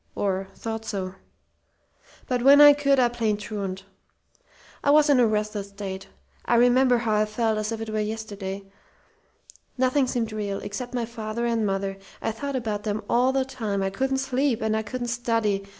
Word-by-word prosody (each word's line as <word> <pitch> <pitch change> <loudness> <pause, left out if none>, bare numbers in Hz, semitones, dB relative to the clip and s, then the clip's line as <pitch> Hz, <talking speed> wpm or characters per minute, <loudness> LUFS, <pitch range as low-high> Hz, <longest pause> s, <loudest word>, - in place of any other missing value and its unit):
or 195 -1 -1
thought 225 -1 -5
so. 190 -4 -4 1.1
"But 250 -2 -1
when 280 +3 +7
I 290 0 +10
could, 280 -1 +2
I 245 - +5
played 230 -3 -1
truant. 200 -3 -5 1.0
I 285 - +2
was 295 0 +6
in 270 - +5
a 240 - +5
restless 210 -1 -2
state. 195 -1 -7 0.4
I 240 - +1
remember 245 +1 +5
how 230 -2 -1
I 210 0 +3
felt 220 0 0
as 215 +1 -2
if 225 -1 -4
it 225 -1 -5
were 215 - -1
yesterday. 210 -2 -4 1.1
Nothing 260 +1 +2
seemed 235 -3 -2
real, 205 -2 -3
except 245 +5 -5
my 240 -2 -1
father 225 0 -4
and 230 -2 +1
mother. 195 0 -2 0.2
I - - -2
thought 280 +5 -4
about 220 -5 -2
them 210 0 -3
all 250 +2 +3
the 265 0 0
time. 215 -7 -3
I 195 - -1
couldn't 265 +6 0
sleep, 265 -2 0
and 220 0 0
I 220 - 0
couldn't 240 +3 -4
study. 225 -4 0
225 Hz, 180 wpm, -25 LUFS, 205-250 Hz, 1.1 s, I